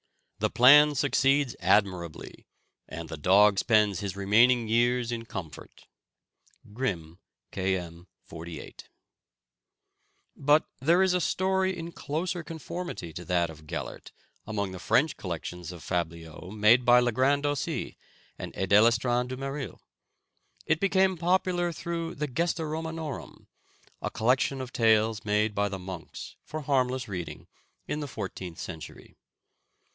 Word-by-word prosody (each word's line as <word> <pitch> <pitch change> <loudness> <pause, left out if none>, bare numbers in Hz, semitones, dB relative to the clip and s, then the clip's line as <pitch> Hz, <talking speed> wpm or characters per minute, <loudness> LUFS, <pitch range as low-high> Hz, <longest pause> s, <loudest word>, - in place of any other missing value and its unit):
The - - +1
plan 145 +4 +7
succeeds 135 -1 +2
admirably, 90 -3 0 0.4
and 85 +1 -7
the 80 - -7
dog 100 +5 +5
spends 105 -5 +3
his 100 -2 -4
remaining 115 +4 +4
years 120 +1 +2
in 115 -1 -4
comfort. 85 -8 -9 0.9
(Grimm, 90 -9 -3 0.3
K. 95 0 0
M. 85 0 -9 0.2
48.) 85 0 -10 1.5
But 145 +2 +3
there 170 +7 +4
is 190 -1 +2
a 180 - +1
story 190 +1 0
in 165 0 -6
closer 170 +4 -3
conformity 165 - -6
to 90 - -8
that 85 -2 +1
of 75 -1 -15
Gellert - - -6 0.4
among 100 -3 -2
the 95 - -8
French 150 - +2
collections 90 -1 -6
of 85 -3 -11
fabliaux 85 -1 -4
made 110 +4 +4
by 120 0 +6
Le 120 0 +2
Grand 135 +4 +2
d'Aussy 145 -1 -2 0.4
and - - -6
Edéléstand 115 +5 +3
du 130 0 -5
Méril. 135 0 -5 0.9
It 160 0 +1
became 190 -1 +3
popular 175 0 +1
through 165 0 -4
the 150 - -2
"Gesta 165 +4 -1
Romanorum," 160 -1 -6 0.6
a - - -2
collection 125 +3 +1
of 130 -1 -7
tales 110 -1 +3
made 105 +1 +1
by 100 0 0
the 95 - -4
monks 90 -2 -8
for 155 0 -6
harmless 130 -3 0
reading, 85 -6 -6 0.4
in 150 - -2
the 145 - -4
fourteenth 95 -7 -6
century. 80 -4 -9
120 Hz, 130 wpm, -28 LUFS, 95-150 Hz, 1.5 s, plan